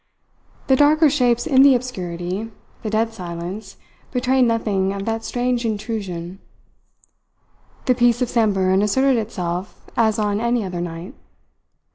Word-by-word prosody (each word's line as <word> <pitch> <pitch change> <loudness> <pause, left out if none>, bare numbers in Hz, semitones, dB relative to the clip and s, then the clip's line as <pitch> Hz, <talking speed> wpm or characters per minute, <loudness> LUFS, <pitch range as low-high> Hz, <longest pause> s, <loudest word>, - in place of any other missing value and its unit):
The 265 - +4
darker 295 +2 +5
shapes 245 -4 +2
in 265 -4 +4
the 275 -1 +7
obscurity, 190 -4 -4 0.3
the 220 - -3
dead 225 +1 0
silence, 185 +1 -7 0.3
betrayed 255 0 +2
nothing 205 -4 0
of 200 0 -5
that 225 0 -2
strange 245 0 -1
intrusion. 200 -5 -4 1.5
The 255 - +4
peace 240 -1 +3
of 250 - +1
Samburan 195 -4 +2
asserted 265 +5 +2
itself 185 -3 -5
as 220 -1 +2
on 210 -1 0
any 235 -1 +1
other 180 -2 -4
night. 170 +1 -6
220 Hz, 130 wpm, -21 LUFS, 190-245 Hz, 1.5 s, the